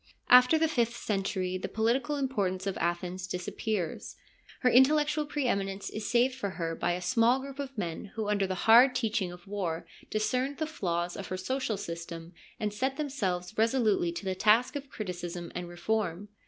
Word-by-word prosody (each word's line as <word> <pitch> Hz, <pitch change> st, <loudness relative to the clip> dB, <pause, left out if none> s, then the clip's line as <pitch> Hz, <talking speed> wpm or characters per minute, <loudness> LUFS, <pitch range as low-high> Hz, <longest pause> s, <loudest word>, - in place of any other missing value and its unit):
After 250 Hz, +5 st, +8 dB
the 320 Hz, +1 st, +3 dB
fifth 240 Hz, -6 st, 0 dB
century 190 Hz, -3 st, -2 dB
the -, -, -3 dB
political 235 Hz, +6 st, +1 dB
importance 200 Hz, -10 st, -1 dB
of 195 Hz, -1 st, -1 dB
Athens 175 Hz, +2 st, -2 dB
disappears; 180 Hz, 0 st, -3 dB, 0.5 s
her 250 Hz, -, +4 dB
intellectual 295 Hz, +4 st, +4 dB
pre 290 Hz, -2 st, -2 dB
eminence 195 Hz, -3 st, -1 dB
is 215 Hz, -1 st, -4 dB
saved 245 Hz, +2 st, +3 dB
for 250 Hz, -6 st, -3 dB
her 165 Hz, -2 st, -2 dB
by 175 Hz, +1 st, 0 dB
a 180 Hz, -, -3 dB
small 230 Hz, +7 st, +3 dB
group 275 Hz, +1 st, -8 dB
of 270 Hz, -3 st, -5 dB
men 170 Hz, -1 st, -3 dB
who 220 Hz, -2 st, -2 dB
under 200 Hz, -2 st, +1 dB
the 185 Hz, -, -2 dB
hard 245 Hz, +3 st, +7 dB
teaching 215 Hz, -6 st, 0 dB
of 175 Hz, +1 st, -12 dB
war 175 Hz, -5 st, -3 dB, 0.2 s
discerned 255 Hz, +6 st, 0 dB
the 315 Hz, -, -1 dB
flaws 175 Hz, -, -2 dB
of 200 Hz, -, -6 dB
her 185 Hz, -, -3 dB
social 225 Hz, +2 st, -2 dB
system 170 Hz, 0 st, -7 dB, 0.3 s
and 210 Hz, -1 st, -1 dB
set 265 Hz, +5 st, -1 dB
themselves 215 Hz, -, -2 dB
resolutely 220 Hz, -6 st, +2 dB
to 185 Hz, -, -6 dB
the 190 Hz, -, 0 dB
task 220 Hz, +8 st, +3 dB
of 280 Hz, -1 st, -5 dB
criticism 175 Hz, -5 st, -5 dB
and 180 Hz, -1 st, -5 dB
reform. 195 Hz, +1 st, -2 dB
210 Hz, 180 wpm, -30 LUFS, 180-255 Hz, 0.5 s, After